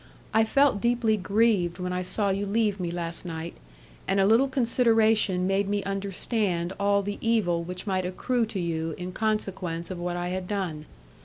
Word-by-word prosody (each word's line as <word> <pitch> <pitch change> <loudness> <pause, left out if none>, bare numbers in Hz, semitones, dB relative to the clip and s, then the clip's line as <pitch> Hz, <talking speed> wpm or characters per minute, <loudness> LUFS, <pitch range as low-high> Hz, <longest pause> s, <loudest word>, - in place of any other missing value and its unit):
I 220 0 +4
felt 275 -3 +3
deeply 235 -2 +2
grieved 200 -3 +1
when 180 -1 -3
I 180 - -1
saw 200 +2 0
you 200 +1 -1
leave 210 -1 +1
me 175 -2 -2
last 170 -1 -3
night, 165 -1 -5 0.5
and 195 - +2
a 195 - +4
little 225 +6 +5
consideration 225 -7 +3
made 195 +1 +1
me 205 -1 0
understand 195 -2 -1
all 200 0 +2
the 205 +1 -4
evil 210 -7 +1
which 180 +3 -6
might 190 -2 0
accrue 235 +5 -1
to 205 - -4
you 165 -2 -2
in 180 +1 -5
consequence 190 -5 -2
of 180 - -5
what 175 0 -3
I 175 0 -2
had 185 0 -3
done. 180 -7 -3
195 Hz, 180 wpm, -26 LUFS, 180-220 Hz, 0.5 s, little